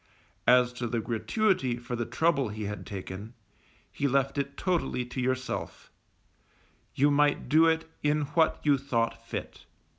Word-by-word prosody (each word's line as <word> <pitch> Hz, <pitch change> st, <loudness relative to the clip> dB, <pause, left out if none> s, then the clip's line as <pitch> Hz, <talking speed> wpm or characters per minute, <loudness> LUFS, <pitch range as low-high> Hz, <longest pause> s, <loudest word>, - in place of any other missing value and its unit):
As 125 Hz, 0 st, +5 dB
to 125 Hz, -1 st, -4 dB
a 115 Hz, 0 st, -1 dB
gratuity 130 Hz, -, 0 dB
for 120 Hz, 0 st, -5 dB
the 120 Hz, 0 st, -3 dB
trouble 145 Hz, -7 st, +1 dB
he 105 Hz, +1 st, -5 dB
had 105 Hz, 0 st, -5 dB
taken, 100 Hz, +3 st, -7 dB, 0.6 s
he 140 Hz, -, -1 dB
left 135 Hz, +1 st, +1 dB
it 140 Hz, 0 st, -3 dB
totally 165 Hz, -9 st, 0 dB
to 125 Hz, +1 st, -4 dB
yourself; 130 Hz, 0 st, -3 dB, 1.0 s
you 145 Hz, +2 st, +4 dB
might 145 Hz, 0 st, +2 dB
do 160 Hz, +2 st, +5 dB
it 160 Hz, 0 st, +1 dB
in 150 Hz, +1 st, +2 dB
what 160 Hz, +1 st, +3 dB
you 145 Hz, -2 st, +3 dB
thought 115 Hz, -4 st, -1 dB
fit. 115 Hz, -, -7 dB
130 Hz, 150 wpm, -28 LUFS, 120-145 Hz, 1.0 s, As